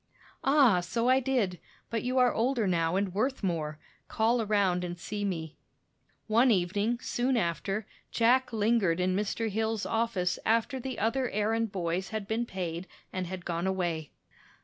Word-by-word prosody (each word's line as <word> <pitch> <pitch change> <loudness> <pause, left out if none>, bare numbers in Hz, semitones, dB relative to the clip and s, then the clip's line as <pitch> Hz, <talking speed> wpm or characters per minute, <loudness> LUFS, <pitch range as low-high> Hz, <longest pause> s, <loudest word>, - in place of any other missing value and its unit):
"Ah, 270 -9 +5
so 230 +7 -1
I 260 +1 +5
did; 245 -9 0 0.3
but 230 -1 0
you 255 +1 -1
are 250 -1 +5
older 240 -1 +1
now 170 -2 +1
and 195 -1 0
worth 255 +5 -1
more. 155 -5 -1 0.3
Call 230 +2 +2
around 200 -4 +1
and 175 0 -4
see 205 +4 -4
me." 165 -6 -3 0.7
One 235 +4 +4
evening, 205 +3 +1
soon 250 +1 0
after, 195 +2 -1 0.2
Jack 250 +2 +3
lingered 210 -6 +2
in 185 0 +1
Mr. 210 +3 -1
Hill's 220 0 -1
office 225 -6 0
after 230 +4 +1
the 255 -1 -5
other 245 +4 0
errand 220 +1 0
boys 180 0 -2
had 215 -2 -4
been 230 +2 -1
paid 180 -2 -4 0.3
and 185 -1 -2
had 180 0 -6
gone 170 +1 -1
away. 175 -5 -1
210 Hz, 160 wpm, -29 LUFS, 180-235 Hz, 0.7 s, Ah